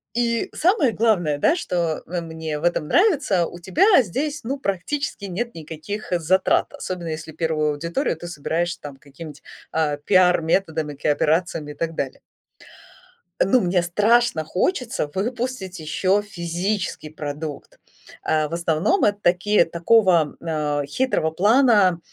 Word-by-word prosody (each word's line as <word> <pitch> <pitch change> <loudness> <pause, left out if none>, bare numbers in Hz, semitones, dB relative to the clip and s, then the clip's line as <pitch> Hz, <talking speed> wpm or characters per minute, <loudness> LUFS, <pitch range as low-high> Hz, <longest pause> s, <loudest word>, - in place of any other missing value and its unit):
И 235 -1 0
самое 335 - +2
главное, 185 -10 +1
да, 310 - +3
что, 170 - -2
э, 175 +1 -3
мне 160 -2 -5
в - - -11
этом 170 -3 0
нравится- 280 - +3
у - - -10
тебя 310 - +4
здесь, 290 - -3
ну, 275 +4 -3
практически 200 +3 -3
нет 215 +6 -4
никаких 160 +7 -7
затрат, 185 +3 +2
особенно 180 -2 -5
если 160 0 -6
первую 155 -2 0
аудиторию 170 - -2
ты 175 - -8
собираешь 170 +1 -2
там 145 -2 -10
какими-нибудь, 145 +2 -11 0.3
а, 155 -2 0
пиар-методами, 165 -2 +2
кооперациями 150 +2 0
и - - -11
так 165 -1 -3
далее. 135 -3 -4 1.2
Ну, 250 +7 +4
мне 180 -1 +1
страшно 210 +1 +2
хочется 225 - -1
выпустить 230 -2 -3
еще 185 +6 +1
физический 180 -2 -3
продукт. 150 -1 -7 0.4
Э, 155 -1 +1
в 165 - -9
основном, 170 - +1
это 205 -1 +3
такие 180 +1 +3
такого, 170 -2 +3
а, 150 -3 -1
хитрого 160 - 0
плана, 205 -1 +4
175 Hz, 135 wpm, -22 LUFS, 160-215 Hz, 1.2 s, тебя